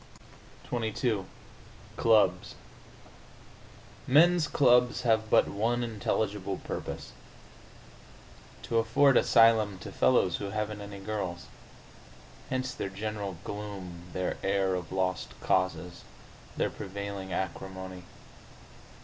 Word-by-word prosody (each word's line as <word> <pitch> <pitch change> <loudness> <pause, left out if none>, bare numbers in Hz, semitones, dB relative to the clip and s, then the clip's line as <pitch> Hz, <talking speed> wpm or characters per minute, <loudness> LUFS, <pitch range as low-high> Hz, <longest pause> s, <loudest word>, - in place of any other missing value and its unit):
XXII 110 -3 -1 0.7
CLUBS 105 -5 +3 1.5
Men's 165 +4 +5
clubs 125 -3 +3
have 110 -2 +2
but - - +5
one 120 +4 0
intelligible 105 -3 -2
purpose: - - -6 1.5
to 115 - +1
afford 125 +5 +4
asylum 110 -5 +5
to 90 - -9
fellows 65 0 +3
who - - -5
haven't 105 0 -3
any 100 -1 -8
girls. 95 -4 -4 1.0
Hence 130 0 -2
their 100 - -4
general 100 -1 -4
gloom, 95 -4 -7
their 90 +2 -2
air 95 -1 +1
of 90 -2 -4
lost 95 -1 -2
causes, 90 -1 -1 0.5
their - - 0
prevailing 100 -1 -6
acrimony. 95 0 -5
100 Hz, 95 wpm, -29 LUFS, 95-115 Hz, 1.5 s, Men's